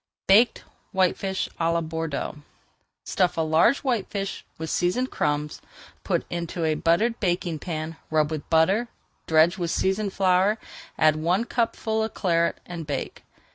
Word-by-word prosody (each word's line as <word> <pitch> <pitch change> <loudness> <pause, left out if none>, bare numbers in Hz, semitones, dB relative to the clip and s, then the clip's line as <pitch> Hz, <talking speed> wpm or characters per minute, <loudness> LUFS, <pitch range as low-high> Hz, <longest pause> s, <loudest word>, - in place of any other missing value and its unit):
BAKED 220 +5 +5 0.3
WHITEFISH 190 0 0
À 165 0 +2
LA 170 - +1
BORDEAUX 160 -2 -4 0.6
Stuff 180 -2 0
a - - +2
large 160 - +3
whitefish 205 -6 -2
with 160 -1 -4
seasoned 245 +9 0
crumbs, 150 0 -1 0.4
put - - 0
into 170 -1 -3
a 155 - +2
buttered 210 +10 +1
baking 175 -4 -1
pan, 160 -1 -5
rub 155 -1 +2
with 155 -2 -5
butter, 190 +9 +3 0.4
dredge 160 +3 +4
with 170 -1 -1
seasoned 195 +3 0
flour, 190 +2 +3 0.4
add 155 -1 +4
one 175 +8 +1
cupful 225 -2 -1
of 220 0 -3
Claret, 170 -3 +1
and 170 -3 -7
bake. 140 -3 -4
175 Hz, 140 wpm, -25 LUFS, 160-195 Hz, 0.6 s, BAKED